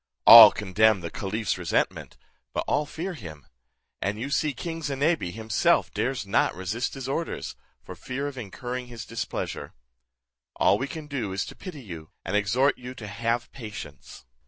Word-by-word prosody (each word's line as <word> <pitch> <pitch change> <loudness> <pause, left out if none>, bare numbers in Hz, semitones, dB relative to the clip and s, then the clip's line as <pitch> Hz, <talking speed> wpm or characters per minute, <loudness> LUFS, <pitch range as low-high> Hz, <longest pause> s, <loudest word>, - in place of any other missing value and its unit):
All 115 -2 +13
condemn 105 0 +2
the 85 - -6
caliph's 105 0 -2
resentment, 85 -2 -1 0.4
but - - -1
all 145 0 0
fear 175 +5 -5
him; 80 - -10 0.6
and 105 +2 -2
you 135 +4 -4
see 155 +1 +1
king 165 +3 -6
Zinebi 145 - 0
himself 110 +2 +1
dares 125 -3 -1
not 100 +3 +1
resist 105 +10 -3
his 135 -1 -6
orders, 160 +5 -3 0.3
for - - -9
fear 135 +2 -5
of 145 - -6
incurring 125 +2 -6
his 120 -2 -8
displeasure. 115 -9 -5 0.8
All - - +3
we 130 - -2
can 155 +1 -7
do 125 -10 -4
is 95 - -1
to - - -10
pity 160 -8 -9
you, 80 -6 -9 0.2
and 95 - -2
exhort 120 +7 +2
you 125 +1 -8
to 115 - -8
have 115 +3 -2
patience." 110 - -9
115 Hz, 165 wpm, -26 LUFS, 100-140 Hz, 0.8 s, All